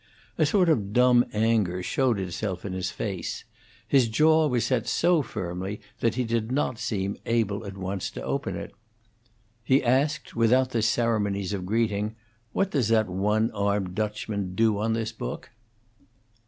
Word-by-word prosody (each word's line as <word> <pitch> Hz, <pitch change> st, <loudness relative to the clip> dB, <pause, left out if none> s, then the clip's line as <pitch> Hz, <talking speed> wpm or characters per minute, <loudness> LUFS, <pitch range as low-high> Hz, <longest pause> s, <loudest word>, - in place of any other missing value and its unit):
A -, -, +4 dB
sort 195 Hz, -5 st, +3 dB
of 105 Hz, -11 st, +1 dB
dumb 125 Hz, 0 st, +5 dB
anger 105 Hz, -5 st, +1 dB
showed 125 Hz, 0 st, +1 dB
itself 95 Hz, +1 st, -4 dB
in 95 Hz, -, -4 dB
his 95 Hz, -1 st, -2 dB
face; -, -, -4 dB, 0.4 s
his 135 Hz, -4 st, +4 dB
jaw 155 Hz, +7 st, +4 dB
was 120 Hz, -5 st, +1 dB
set 115 Hz, -2 st, 0 dB
so 175 Hz, -3 st, +3 dB
firmly 95 Hz, -3 st, -5 dB, 0.2 s
that 115 Hz, -1 st, +1 dB
he 125 Hz, -, 0 dB
did 115 Hz, 0 st, -1 dB
not 130 Hz, -4 st, 0 dB
seem 100 Hz, -3 st, -2 dB
able 110 Hz, -3 st, 0 dB
at 100 Hz, 0 st, -8 dB
once 95 Hz, 0 st, -3 dB
to -, -, -5 dB
open -, -, -2 dB
it. -, -, -7 dB, 0.9 s
He 130 Hz, +4 st, +3 dB
asked, 135 Hz, +5 st, +1 dB
without 125 Hz, +3 st, +3 dB
the 115 Hz, -, 0 dB
ceremonies 105 Hz, -4 st, 0 dB
of 95 Hz, -2 st, -4 dB
greeting, 110 Hz, 0 st, 0 dB, 0.4 s
"What 195 Hz, 0 st, 0 dB
does 130 Hz, -8 st, +1 dB
that 110 Hz, -3 st, +2 dB
one 105 Hz, +5 st, +1 dB
armed 100 Hz, -2 st, -1 dB
Dutchman 105 Hz, -2 st, -3 dB
do 110 Hz, -2 st, +2 dB
on 110 Hz, +1 st, 0 dB
this 115 Hz, 0 st, -2 dB
book?" 115 Hz, -, -6 dB
110 Hz, 160 wpm, -26 LUFS, 100-120 Hz, 0.9 s, dumb